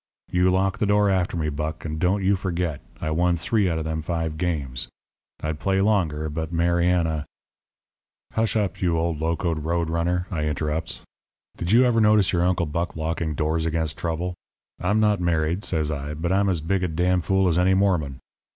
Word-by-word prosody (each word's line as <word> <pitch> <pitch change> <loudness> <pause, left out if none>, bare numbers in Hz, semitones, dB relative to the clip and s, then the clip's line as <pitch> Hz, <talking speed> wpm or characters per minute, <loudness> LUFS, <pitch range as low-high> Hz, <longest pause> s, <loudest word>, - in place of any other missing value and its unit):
You 90 +1 +3
lock 95 +1 +1
the 105 - +1
door 105 0 +3
after 90 -2 0
me, 75 -2 0
Buck. 75 +2 -4
And 80 0 -3
don't 95 +3 +1
you 100 +2 +3
forget 90 -5 -2 0.2
I 80 - -2
won 90 +2 +2
three 95 +3 +1
out 80 - -1
of 80 - -2
them 80 0 -2
five 80 -1 -2
games. 75 -8 -2 0.6
I'd 75 -1 -2
play 95 0 +1
longer, 85 -7 +1
but 80 +1 -4
Mariana 85 -2 +1 0.5
' - - -41
"'Hush 110 0 0
up, 100 -4 -1
you 85 -3 +2
old 80 -1 -1
locoed 80 -1 -1
road 85 0 -1
runner,' 90 +2 0
I 75 -4 -1
interrupts. 75 +2 -2 0.5
'Did 85 - -3
you 120 +3 +6
ever 115 -2 +3
notice 105 -3 +4
your 85 -1 +2
Uncle 90 -1 +2
Buck 85 +3 -3
locking 80 0 -2
doors 80 +2 0
against 80 -1 -1
trouble? 85 +2 -2 0.5
I'm 105 +5 +1
not 105 -2 +3
married,' 85 +2 0
says 80 -6 -1
I, 75 0 -4
'but 85 +3 -2
I'm 100 +1 +3
as 85 -4 0
big 90 +4 0
a - - +2
d 85 +2 -1
n 90 0 +3
fool 95 +3 +2
as 85 0 +2
any 95 +1 +4
Mormon. 90 -9 +1
85 Hz, 195 wpm, -24 LUFS, 80-95 Hz, 0.6 s, you